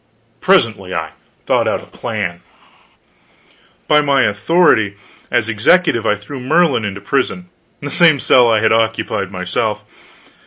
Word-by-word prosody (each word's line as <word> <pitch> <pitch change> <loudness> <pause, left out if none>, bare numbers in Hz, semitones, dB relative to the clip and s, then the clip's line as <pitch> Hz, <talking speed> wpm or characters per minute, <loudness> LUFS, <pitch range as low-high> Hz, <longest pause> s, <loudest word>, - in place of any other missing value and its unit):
I 115 +1 -38
presently 115 - +1 0.5
thought - - +1
out - - -2
a - - -13
plan. 85 0 -5 1.5
By 150 - +4
my 140 -3 +2
authority 105 - +2 0.3
as 120 -3 0
executive 115 - +2
I 105 - +2
threw 120 +7 -9
Merlin 140 -2 +1
into 100 -1 -5
prison 140 - -2 0.3
the 145 0 -6
same 160 -3 +4
cell 125 -1 +4
I 110 -2 +2
had 110 - +2
occupied 110 -3 -1
myself. 105 +3 -3
115 Hz, 130 wpm, -16 LUFS, 105-145 Hz, 1.5 s, By